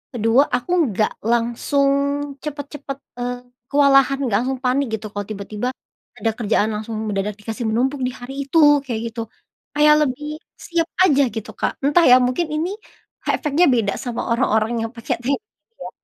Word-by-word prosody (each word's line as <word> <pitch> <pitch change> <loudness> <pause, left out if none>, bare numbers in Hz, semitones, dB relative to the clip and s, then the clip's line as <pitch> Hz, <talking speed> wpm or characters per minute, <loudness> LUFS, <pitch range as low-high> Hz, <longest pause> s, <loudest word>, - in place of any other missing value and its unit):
Kedua, 230 +4 +4
aku 250 +8 -3 0.2
enggak 215 -1 0
langsung 240 +5 +1 0.5
cepet-cepet, 285 -2 -6 0.2
eee, 245 0 -2 0.3
kewalahan, 275 -1 +5
nggak 225 -6 +1
langsung 265 0 -2
panik 260 +2 +1
gitu 215 - -7
kalau 205 0 -4
tiba-tiba, 210 +2 -4 0.5
ada 225 - -1
kerjaan 220 -2 +1
langsung 220 +1 -5
mendadak 205 0 -2
dikasih 225 +3 -5
menumpuk 255 +6 0
di - - -3
hari 250 +2 -9
itu, 295 -1 +5
kayak 240 -5 -3
gitu. 230 0 -5 0.5
Kayak 300 0 +6
lebih 295 +4 -5 0.2
siap 335 -1 -1 0.2
aja 285 -6 +5
gitu 220 - -5
Kak. - - -2
Entah 295 +5 +4
ya, 250 - +9
mungkin 255 +7 0
ini, 330 +4 -1 0.6
efeknya 310 +3 +2
beda 225 -5 +1
sama 240 -2 -4
orang-orang 230 -1 +1
yang - - -14
pakai 230 - -2
teknik 275 +3 0
itu 430 - -66
ya. - - -6
250 Hz, 160 wpm, -21 LUFS, 225-285 Hz, 0.6 s, ya